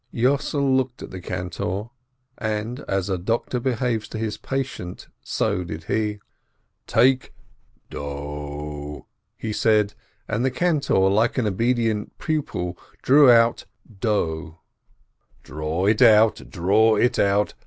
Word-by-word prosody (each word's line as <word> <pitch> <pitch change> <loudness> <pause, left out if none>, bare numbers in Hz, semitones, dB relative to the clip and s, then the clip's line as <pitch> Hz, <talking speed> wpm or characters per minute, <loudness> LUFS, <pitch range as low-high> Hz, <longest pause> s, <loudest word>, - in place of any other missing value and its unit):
Yossel 140 +2 +1
looked 130 -1 -1
at - - -9
the 95 - -7
cantor, 90 +4 -4 0.5
and 110 +3 -3
as 95 -1 -1
a 95 -2 -1
doctor 115 +6 -1
behaves 120 -3 -1
to - - -7
his 110 -1 -2
patient, 135 -10 -5 0.2
so 90 - -1
did 80 -2 -7
he: 105 +3 -1 0.7
"Take 130 +3 +2 0.6
do!" 75 0 -6 0.3
he 110 - -4
said, 105 -2 +2 0.3
and 110 +3 -1
the 130 - +3
cantor, 155 - +1
like 110 +6 +2
an 125 - +1
obedient 115 +1 0
pupil, 90 - -3 0.2
drew 140 0 +7
out 115 0 +4 0.3
do. 85 -6 -1 0.9
"Draw 75 +4 -3
it 105 +4 +2
out, 110 -2 +5
draw 110 +5 +3
it 120 +4 +2
out! 100 +1 +2
110 Hz, 120 wpm, -23 LUFS, 90-120 Hz, 0.9 s, drew